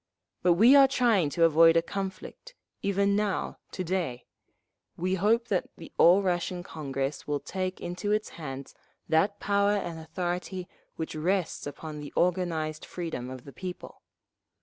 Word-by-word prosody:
But 180 - +5
we 230 +10 +7
are 275 -1 +8
trying 230 - +2
to 165 +3 +1
avoid 165 +1 +6
a 165 - +3
conflict, 195 - -6 0.3
even 200 0 +2
now, 205 -2 -1
to 185 - -4
day. 170 -9 -2 0.7
We 185 +2 -1
hope 225 +5 +2
that 185 -3 0
the 165 - -11
All 180 +4 +7
Russian 180 -1 -1
Congress 135 -3 -4
will 145 -1 0
take… 185 +2 -4
into 180 +4 -3
its 215 0 0
hands 135 -4 -7 0.3
that 195 +6 +2
power 200 0 +2
and 170 -5 -3
authority 180 +2 -4 0.3
which 160 - -4
rests 170 0 -1
upon 150 +1 -7
the 145 -1 -8
organised 165 -4 0
freedom 160 -8 -5
of 130 -1 -8
the 140 - -12
people. 185 -1 -8
175 Hz, 150 wpm, -28 LUFS, 160-200 Hz, 0.7 s, are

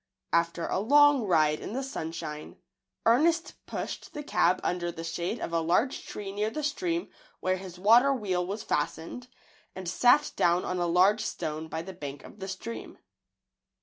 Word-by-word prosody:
After 170 0 +1
a - - -1
long 285 +2 +5
ride 155 -4 +3
in - - -6
the 265 +2 -2
sunshine, 160 - -6 0.5
Ernest 320 +9 +2
pushed - - -5
the 295 - -4
cab 185 -9 +2
under 175 -1 -1
the 165 - -7
shade 170 +6 -3
of 170 - -5
a 165 - +3
large 180 +11 +1
tree 200 -2 -6
near 210 +2 -1
the 305 +7 -4
stream 335 +4 -1 0.3
where 185 0 0
his 185 -1 -9
water 230 +8 +6
wheel 195 -9 0
was 200 +4 -4
fastened, 160 +11 -3 0.5
and 185 -1 -6
sat 250 - +4
down 175 +1 +2
on 180 - -2
a 175 - +1
large 190 +5 +4
stone 155 -6 -4
by 160 0 -4
the 190 +2 -8
bank 145 -4 -7
of - - -13
the 190 - -5
stream. 195 +4 -7
190 Hz, 175 wpm, -28 LUFS, 170-245 Hz, 0.5 s, water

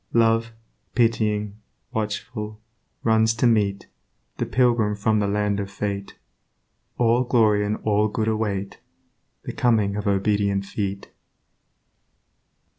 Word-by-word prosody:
Love, 115 0 +3 0.4
pitying, 105 -3 +1 0.4
watchful, 105 0 -4 0.4
runs 110 0 +3
to 115 - +1
meet 105 -4 +2 0.5
The - - -2
Pilgrim 120 -4 +2
from 105 +1 +1
the 100 - +1
Land 105 0 0
of 100 -1 -4
Fate; 100 0 -4 0.8
All 120 +1 +3
glory 110 -4 +3
and 105 +1 -1
all 105 0 +2
good 110 +1 -2
await 105 -3 -2 0.6
The - - -6
coming 110 -5 +2
of 105 0 -3
obedient 100 0 +1
feet. 100 -1 -4
105 Hz, 115 wpm, -23 LUFS, 100-115 Hz, 0.8 s, Love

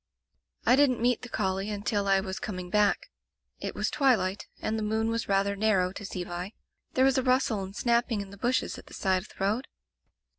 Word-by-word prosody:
"I 250 - +6
didn't 270 -3 +4
meet 245 +1 +2
the 250 - -8
collie 195 -1 -1
until 205 -1 -1
I 195 0 +4
was 190 -1 -5
com 210 -6 -4
ing 180 -1 -7
back. 210 -1 +2 0.5
It - - -4
was - - -1
twilight, 225 -10 +2
and 220 - -1
the 220 - -2
moon 220 +1 0
was 230 -2 -2
rather 200 0 +2
narrow 195 -3 +2
to 205 - -8
see 185 -2 -4
by. 175 +4 -5 0.4
There 260 - +5
was 270 0 +4
a - - -1
rustle 255 -5 +2
and 190 +1 -7
snapping 235 -1 +1
in 200 -1 -6
the 200 - -11
bushes 245 +5 0
at - - -15
the - - -10
side 190 -2 +1
of 205 - -14
the - - -17
road. 210 +7 0
210 Hz, 220 wpm, -28 LUFS, 195-240 Hz, 0.5 s, I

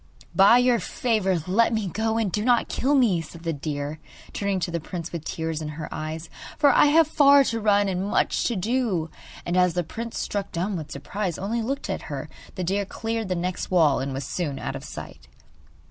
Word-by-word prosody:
'By 200 +5 +7
your 245 -1 +3
favour 190 -4 0
let 225 +6 +3
me 220 -2 0
go, 220 +4 -1
and 220 -4 0
do 210 - -1
not 240 0 +3
kill 280 +3 +1
me,' 220 -11 +3
said 165 +1 -11
the 165 -1 -1
deer, 145 +1 -4 0.3
turning 200 -2 -1
to 170 - -2
the 170 - -1
prince 170 +1 -6
with 170 -3 -5
tears 160 -1 -3
in 155 - -4
her 155 - -5
eyes, 155 +1 -5 0.3
'for 290 -2 +5
I 295 - +6
have 315 +1 +5
far 285 -2 +6
to 230 -3 -1
run 205 -1 +3
and 190 +1 -1
much - - +1
to 235 - 0
do.' 200 -5 0 0.3
And 175 - -1
as 180 -1 +3
the 175 - +1
prince, 230 +8 -6
struck 200 -1 -3
dumb 185 +4 -2
with 155 -4 -6
surprise, 180 +5 -3
only 225 +5 -2
looked 270 +5 -3
at - - -3
her, - - -5 0.3
the 185 - -3
deer 195 +3 0
cleared 225 +2 -3
the 185 - 0
next 180 +1 -3
wall 160 -6 +4
and 135 +1 -3
was 135 0 -4
soon 145 -3 -3
out - - -4
of - - -7
sight. - - -9
190 Hz, 215 wpm, -25 LUFS, 165-225 Hz, 0.3 s, By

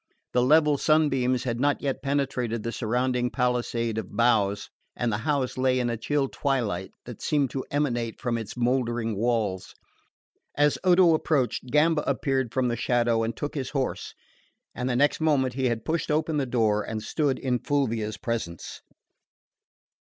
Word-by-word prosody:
The 125 - +3
level 150 +2 +4
sunbeams 135 -5 +2
had 120 -3 -2
not 145 +2 +2
yet 135 -1 -2
penetrated 135 -5 -1
the 115 - -2
surrounding 125 +2 0
palisade 120 -3 -1
of 105 - -8
boughs, 105 -4 +2 0.2
and 120 -1 -1
the 105 - -1
house 135 -3 0
lay 130 0 +2
in 120 -1 0
a - - -1
chill 135 +5 0
twilight 115 -11 -2
that - - -9
seemed 145 -4 0
an 135 - -2
emanation 120 -6 -1
from 120 -2 -2
its 115 0 -5
mouldering 120 -2 0
walls. 110 -4 -1 0.8
As 145 0 +2
Odo 180 -2 +5
approached, 145 -6 0
Gamba 150 +4 +3
appeared 130 -4 0
from 130 0 0
the 120 - 0
shadow 120 -1 +1
and 115 0 -2
took 145 - -4
his 135 -3 -3
horse; 135 -2 -3 0.6
and 125 +1 -3
the 125 - 0
next 145 +5 +2
moment 140 -5 +2
he 130 +1 -1
had 120 -3 -1
pushed 165 +1 -1
open 155 0 0
the 135 -2 0
door, 110 -4 +2
and 110 0 -5
stood 145 +2 0
in 125 -2 -1
Fulvia's 115 -7 -1
presence. 115 -9 -5
125 Hz, 165 wpm, -26 LUFS, 115-140 Hz, 0.8 s, Odo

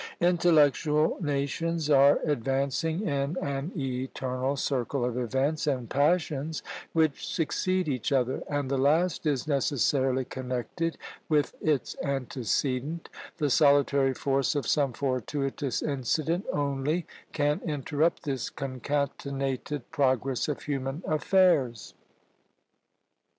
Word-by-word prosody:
Intellectual 155 -3 +3
nations 150 +2 -1
are 140 -1 +6
advancing 140 - 0
in 140 +3 -1
an 140 +4 -3
eternal 130 0 -2
circle 130 -1 -1
of 125 -1 -2
events 135 +6 0
and 130 -5 -1
passions 155 0 +1 0.3
which 160 -3 +1
succeed 185 +3 0
each 130 -2 -1
other, 130 -1 +1
and 145 -2 -1
the 135 - +1
last 155 +4 +2
is 145 -1 0
necessarily 135 -2 +1
connected 130 +7 -3 0.3
with 150 -2 +2
its 150 -4 0
antecedent; 135 - -2 0.3
the 150 -4 0
solitary 140 -1 +4
force 135 +1 0
of 140 -4 -1
some 140 0 +2
fortuitous 135 +2 -2
incident 155 - -1
only 145 +4 -1 0.3
can 145 -1 0
interrupt 150 +1 0
this 135 -5 -2
concatenated 140 0 -3
progress 135 -4 +1
of 150 - -3
human 140 +3 -3
affairs. 155 - +2
140 Hz, 105 wpm, -28 LUFS, 130-155 Hz, 0.3 s, are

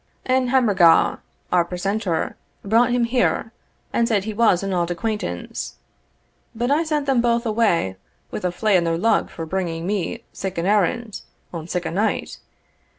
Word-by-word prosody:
Ane 255 0 +2
Hammorgaw, 205 -10 +4 0.3
our 180 -1 +4
precentor, 180 0 -2 0.3
brought 230 +4 +4
him 245 0 +2
here, 235 -1 +1 0.4
and 235 - +2
said 210 -5 +1
he 220 +1 -4
was 205 -4 +3
an 195 -1 -2
auld 175 -1 0
acquaintance; 175 - -4 0.8
but 240 +3 -1
I 305 +3 +3
sent 305 -3 -1
them 270 -4 +2
both 235 0 +1
away 210 - +1 0.3
wi' - - -3
a 180 - 0
flae 210 +3 +1
in 175 - +1
their 165 -1 0
lug 225 +6 +2
for 165 - -6
bringing 170 -1 -3
me 205 +4 -2
sic 190 -2 -5
an 170 - -1
errand, 210 +2 +1 0.3
on 165 -2 -6
sic 180 0 -2
a - - -2
night. 205 +6 -1
205 Hz, 165 wpm, -22 LUFS, 175-235 Hz, 0.8 s, Hammorgaw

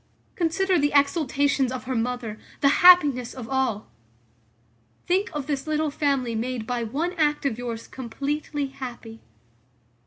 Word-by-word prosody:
Consider 365 +1 +1
the 290 0 +1
exultations 280 -2 +2
of 255 -1 -5
her 260 +1 -3
mother, 235 -2 -3 0.2
the 280 - +5
happiness 295 -9 +6
of 250 -4 -7
all. 260 -5 -1 1.2
Think 380 +5 +1
of 295 -4 -4
this 285 0 -3
little 310 -1 0
family 275 -5 0
made 235 0 -3
by 245 0 -2
one 290 +11 -2
act 295 -2 +1
of 240 -4 -1
yours 235 -2 -5
completely 285 +4 -4
happy. 235 -4 -9
275 Hz, 135 wpm, -25 LUFS, 245-300 Hz, 1.2 s, happiness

